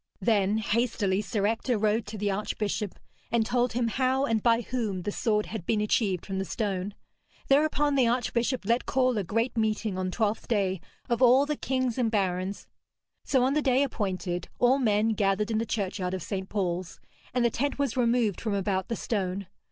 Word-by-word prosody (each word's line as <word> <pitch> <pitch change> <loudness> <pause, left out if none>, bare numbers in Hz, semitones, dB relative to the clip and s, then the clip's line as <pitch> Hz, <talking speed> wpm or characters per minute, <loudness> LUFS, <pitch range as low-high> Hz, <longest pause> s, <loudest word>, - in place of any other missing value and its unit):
Then 205 0 +2
hastily 210 -3 0
Sir 205 0 -1
Ector 225 +2 0
rode 215 +1 +1
to 215 +1 -6
the 205 0 0
archbishop, 210 0 -2 0.3
and 230 -1 +2
told 245 0 +1
him 240 0 +1
how 260 +3 +1
and 225 -4 +1
by 230 +1 +3
whom 220 -6 -3
the 205 - -2
sword 210 0 0
had 220 -5 -6
been 220 - +2
achieved 210 -3 +1
from 190 -1 -3
the - - 0
stone. 195 -1 -3 0.5
Thereupon 295 0 +3
the 260 -4 +4
archbishop 240 0 0
let 235 +3 +1
call 255 -1 +2
a - - -1
great 230 +7 -1
meeting 215 -3 0
on 185 0 -1
Twelfth 215 +2 -1
Day 190 -5 0 0.3
of 235 +1 0
all 255 +3 +6
the 300 +1 -1
kings 255 -3 -1
and 235 -3 +2
barons. 190 -2 -1 0.6
So 260 -3 +2
on 265 +2 +2
the 300 - +2
day 265 -1 +3
appointed, 185 -8 -2
all 250 +3 +4
men 215 -3 +2
gathered 210 0 +1
in 220 - +1
the 225 - -2
churchyard 190 -3 -2
of 185 - -5
St. 190 -1 -4
Paul's, 180 -3 -2 0.3
and 245 -1 +1
the 235 - +3
tent 280 +4 -1
was 280 -5 -1
removed 235 -5 +1
from 215 -3 -1
about 190 -1 -1
the 230 - -2
stone. 195 -3 -2
220 Hz, 190 wpm, -28 LUFS, 195-245 Hz, 0.6 s, all